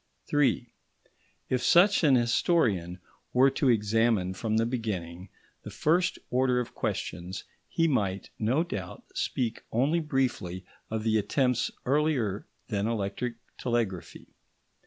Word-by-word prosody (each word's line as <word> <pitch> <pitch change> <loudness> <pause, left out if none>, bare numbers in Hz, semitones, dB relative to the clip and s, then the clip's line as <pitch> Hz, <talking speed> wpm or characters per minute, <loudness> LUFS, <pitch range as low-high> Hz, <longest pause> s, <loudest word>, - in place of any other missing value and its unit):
§ - - -40
3 135 -5 +1 0.7
If 125 -1 0
such 180 +8 +5
an 140 -4 +6
historian 115 - +1 0.3
were 130 +2 +5
to 135 0 +1
examine 110 -3 +2
from 110 +3 -1
the 115 - +2
beginning 95 -7 -4 0.3
the - - -8
first 175 +4 +1
order 125 0 +2
of 125 - -4
questions, 90 +3 -4 0.3
he 165 -1 +2
might, 100 -9 -1
no 125 +9 +2
doubt, 100 - -6
speak 120 -3 -2
only 140 +9 +2
briefly 125 - -2 0.2
of 110 -1 -2
the 110 -1 +2
attempts 125 +3 +1 0.2
earlier 130 -8 +1 0.2
than 105 -2 -1
electric 115 +2 -2 0.2
telegraphy. 110 -8 -2
115 Hz, 125 wpm, -28 LUFS, 100-135 Hz, 0.7 s, an